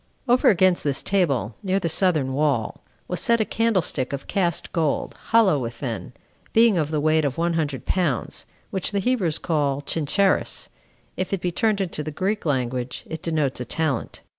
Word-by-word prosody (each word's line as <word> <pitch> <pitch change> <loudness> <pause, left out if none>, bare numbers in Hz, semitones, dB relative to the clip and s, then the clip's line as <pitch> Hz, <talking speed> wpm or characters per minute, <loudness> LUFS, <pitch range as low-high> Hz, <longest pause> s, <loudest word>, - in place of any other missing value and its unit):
7. 245 - +3
Over 250 - +5
against 185 -2 +3
this 140 -2 0
table, 140 - +1
near 195 -1 0
the 175 - -2
southern 155 -6 +2
wall, 140 -6 0 0.3
was - - -2
set 235 0 +3
a 220 - +2
candlestick 190 - 0
of 140 - -4
cast 175 -4 -1
gold, 160 -4 -1
hollow 215 -10 +4
within, 115 -5 -5 0.4
being 225 -2 +5
of 155 -4 0
the 155 -1 0
weight 155 +1 +2
of 140 +1 -1
one 170 +1 +1
hundred 145 -6 -2
pounds, 170 -10 -1 0.2
which 190 +2 -2
the - - 0
Hebrews 195 -8 +1
call 145 -4 0
Chinchares, 165 +7 +1 0.5
if 185 +1 -2
it 195 - 0
be 175 0 -2
turned 210 +3 +1
into 175 -5 -2
the 155 - -4
Greek 190 +5 -2
language, 125 -2 -2
it 160 -1 -5
denotes 155 -7 -1
a 125 - -4
talent. 145 -1 -2
160 Hz, 180 wpm, -23 LUFS, 140-190 Hz, 0.5 s, Over